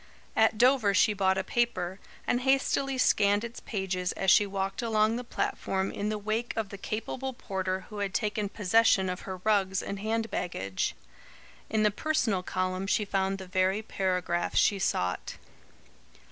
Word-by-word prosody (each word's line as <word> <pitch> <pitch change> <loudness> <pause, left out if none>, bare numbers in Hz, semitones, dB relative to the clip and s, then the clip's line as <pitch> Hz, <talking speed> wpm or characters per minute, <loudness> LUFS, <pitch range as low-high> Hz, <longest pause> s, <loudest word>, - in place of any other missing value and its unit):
At - - +3
Dover 245 -4 +4
she 210 - +4
bought 190 -1 +2
a 190 - 0
paper, 190 -6 -1 0.3
and 245 - +1
hastily 270 0 +1
scanned 205 -4 +3
its 235 0 -6
pages 190 -3 -2
as 190 -1 +2
she 205 +2 +5
walked 195 +2 -3
along 220 -1 +2
the 245 - -3
platform 195 -4 -2
in 205 +1 -3
the 215 - -1
wake 215 +3 -2
of 220 -3 -2
the 200 - -8
capable 260 +6 -4
porter 190 -4 -3
who 210 -2 -9
had 200 -1 -1
taken 210 0 -1
possession 205 -2 +3
of 180 - -6
her 190 - -4
rugs 195 -3 +2
and 200 - -5
hand 225 +2 -1
baggage. 95 - -2 0.7
In 220 -1 +1
the 210 - +4
personal 230 - 0
column 185 +1 -2
she 210 +1 +1
found 195 -1 0
the 190 - -8
very 185 +3 +1
paragraph 180 -4 -1
she 200 - +3
sought. 90 - -1
200 Hz, 165 wpm, -29 LUFS, 190-225 Hz, 0.7 s, she